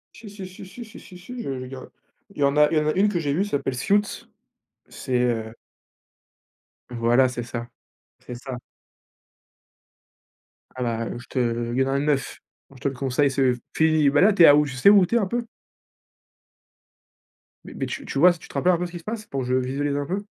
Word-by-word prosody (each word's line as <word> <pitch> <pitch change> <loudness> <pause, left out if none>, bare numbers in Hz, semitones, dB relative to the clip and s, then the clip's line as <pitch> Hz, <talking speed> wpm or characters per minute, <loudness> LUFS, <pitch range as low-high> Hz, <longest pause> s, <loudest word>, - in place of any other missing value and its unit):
Si 215 -2 -11
si 200 -2 -9
si 185 +1 -12
si 235 +5 -10
si 220 - -13
si 180 - -13
si, 245 +7 -8
j'ai 135 - -4
j'ai 130 - -7
ga 130 0 -9 0.4
Il - - -19
y 145 - 0
en 140 +1 +2
a 150 0 +6
il 160 - +2
y - - +5
en 150 - -1
a 155 - +2
une 205 +3 +3
que 180 - -1
j'ai 145 -3 -1
vu, 185 +6 +1
s'appelle 140 -7 -2
«Suits». 205 +10 0 0.6
C'est, 125 -1 -3
heu 115 -2 -1 1.3
Voilà, 120 +2 +3
c'est 120 -1 -5
ça. 120 0 -6 0.5
C'est 125 - -9
ça. 130 0 -7 2.2
Ah 130 - -6
bah, 115 0 -3
je 120 - -11
te 120 -2 -1
il 130 - -1
y - - +4
en - - -2
a 140 - +1
9. 145 -2 -1 0.3
Moi 135 - -16
je - - -19
te - - +1
le 135 - -2
conseille, 135 +2 +1
c'est, 135 +1 -2
heu, 125 -2 +2 0.2
fini. 155 -2 +3
Ben 145 +3 +3
là, 205 +2 +5
tu 175 - +5
es - - +11
à 145 - +8
où? 150 0 +4
Tu 135 - -6
sais 135 +10 +5
où 200 -3 +7
tu 235 - -2
es - - +6
un 200 - -1
peu? 240 +4 -2 2.2
Mais - - -10
mais, - - -3
tu - - -6
tu 135 - -3
vois, 175 +3 +7
tu 165 - -14
te - - -15
rappelles 180 0 +2
un - - +2
peu 180 - -2
ce 175 - -8
qui 175 - -7
se - - -17
passe? 215 +2 -5
Pour 135 -10 -4
que 125 - -4
je 125 - +1
visualise 140 +3 -1
un 145 - -2
peu? 195 +6 -4
140 Hz, 240 wpm, -24 LUFS, 125-180 Hz, 2.2 s, es